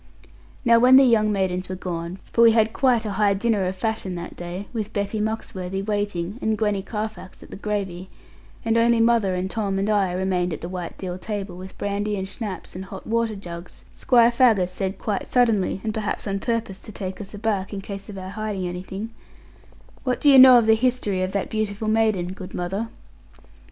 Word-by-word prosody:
Now 230 -1 +6
when 250 +2 +7
the 270 - +9
young 220 -4 +4
maidens 185 -2 -1
were 185 - -3
gone 170 -1 -4 0.2
for 235 - +3
we 230 -1 +7
had 220 -1 +3
quite 245 -4 +2
a 210 - -2
high 200 -1 +4
dinner 205 -2 +1
of 185 - -3
fashion 215 -3 -2
that 175 0 -7
day, 175 +3 -6
with 215 -2 -4
Betty 200 +1 -2
Muxworthy 195 -3 -3
waiting, 205 -1 -2
and 220 0 0
Gwenny 210 -2 0
Carfax 210 -1 -6
at - - -15
the - - -7
gravy 190 -3 -4 0.6
and 225 0 +3
only 235 0 +4
mother, 225 -5 +3
and 180 +1 -1
Tom, 200 -1 -2
and 195 +1 0
I 200 -3 +2
remained 180 -1 0
at - - -6
the 170 - -5
white 180 -2 -6
deal 180 -1 -5
table, 200 -3 -5
with 185 +1 -10
brandy, 205 +1 -2
and 190 0 -3
schnapps, 200 0 -6
and 190 +1 -6
hot 190 0 -9
water 230 -1 0
jugs; 175 -3 -9
Squire 240 -2 +4
Faggus 225 -7 +3
said 190 +1 -3
quite 205 -1 -3
suddenly, 225 -7 +2
and 215 - -2
perhaps 215 -1 -3
on 195 -1 -2
purpose 225 -4 -2
to - - -10
take 190 -1 -6
us 205 +1 -9
aback, 205 -2 -1
in 200 - -4
case 200 +1 -8
of 200 - -7
our 185 0 -6
hiding 210 -3 -3
anything, 190 +5 -6 0.9
'What 250 -2 0
do 290 - +5
you 270 - +9
know 255 -1 +10
of 235 - +4
the 220 - +6
history 220 -5 0
of 185 0 -1
that 200 -2 -1
beautiful 215 0 -2
maiden, 215 -5 +1
good 190 -1 -9
mother?' 195 +6 -2
205 Hz, 205 wpm, -23 LUFS, 185-220 Hz, 0.9 s, know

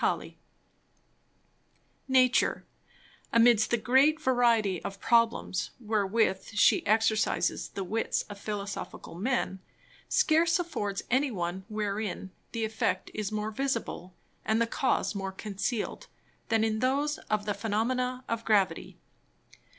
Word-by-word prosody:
Halley_._ - - -1 1.7
Nature, 255 -1 +3 0.7
amidst 230 -2 +5
the 240 - +2
great 270 +7 +4
Variety 235 - +2
of 195 0 -6
Problems, 230 -6 +1
wherewith 210 -3 +1
She 205 - +4
exercises 220 +1 +1
the 195 - -5
Wits 220 +5 -1
of 205 -1 -10
Philosophical 200 -4 -6
Men, 190 0 -1 0.5
scarce 330 +2 +3
affords 205 - -3
any 270 +3 +3
one 185 -3 -4
wherein 210 -3 -3 0.2
the 230 -2 -1
Effect 200 -4 -1
is 215 -2 -3
more 215 0 -2
visible, 230 -7 -3 0.3
and 220 +1 +1
the 230 - +3
Cause 255 +1 0
more 195 -1 -4
concealed, 210 - -4 0.4
than 225 -1 +3
in 220 -1 0
those 280 +4 0
of 215 -1 0
the 205 - 0
Phænomena 250 +5 -1
of 230 0 -2
Gravity. 195 -7 +1
220 Hz, 120 wpm, -29 LUFS, 200-245 Hz, 1.7 s, amidst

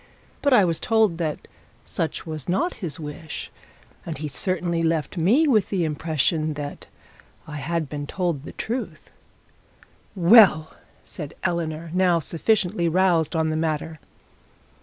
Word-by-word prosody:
But 285 - +2
I 210 -7 +6
was 165 -2 0
told 220 -7 +2
that 155 -3 -3 0.4
such 160 - -3
was 155 -3 -6
not 210 - +1
his 160 -6 -3
wish; 150 +1 -7 0.5
and 160 - -5
he 155 +2 -4
certainly 170 +5 -1
left 160 -2 0
me 220 - +3
with 215 -8 +3
the 190 -4 0
impression 155 0 0
that 145 -1 -7 0.6
I 150 -1 -7
had 160 +2 -2
been 145 +1 -5
told 175 -6 -2
the 150 - -10
truth.' 240 +3 -5 1.0
'Well!' 180 -4 +6 0.3
said 150 -4 -7
Eleanor, 165 -1 -2
now 180 -2 +3
sufficiently 175 +1 0
roused 175 -2 +2
on 160 -1 +1
the - - -1
matter. 160 0 -2
165 Hz, 140 wpm, -24 LUFS, 155-185 Hz, 1.0 s, I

